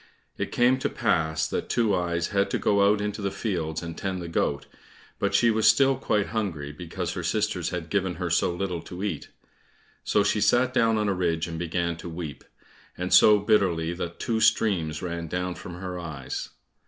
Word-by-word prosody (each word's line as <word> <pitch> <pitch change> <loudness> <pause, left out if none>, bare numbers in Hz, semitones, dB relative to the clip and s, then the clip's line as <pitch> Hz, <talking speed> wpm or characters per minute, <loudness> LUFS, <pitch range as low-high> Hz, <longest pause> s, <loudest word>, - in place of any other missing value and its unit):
It - - -4
came 125 +2 +3
to - - -1
pass 80 0 0
that - - -3
Two 115 -4 +2
eyes 85 -2 0
had 100 0 +1
to - - 0
go 100 -1 +3
out 105 -1 0
into 105 +1 -3
the 100 - 0
fields 85 -7 -3
and 85 -1 -6
tend 95 0 -3
the 85 - -6
goat, 70 -3 -1 0.5
but - - 0
she 115 - +5
was 110 -1 +2
still 135 +5 +5
quite 105 -6 0
hungry, 90 -10 -3
because 80 +3 -5
her - - -4
sisters - - -1
had 85 -2 -5
given 95 -3 0
her 90 -2 -3
so 85 - +2
little 90 -1 -3
to 90 +2 -8
eat. 85 -8 -3 0.7
So 105 - +2
she 105 - +1
sat 125 +3 +3
down 115 -3 +3
on 105 -1 0
a 100 - +2
ridge 85 -3 0
and 80 -1 -5
began 85 0 -1
to 85 - -8
weep, 80 -4 -7 0.5
and 90 +1 -2
so 105 -1 +8
bitterly 95 -6 +2
that 85 -1 -6
two 115 -1 -1
streams 85 -10 +2
ran 85 -1 -4
down 90 +2 -2
from 90 0 -9
her 90 0 -5
eyes. 80 -6 -5
90 Hz, 200 wpm, -26 LUFS, 85-105 Hz, 0.7 s, so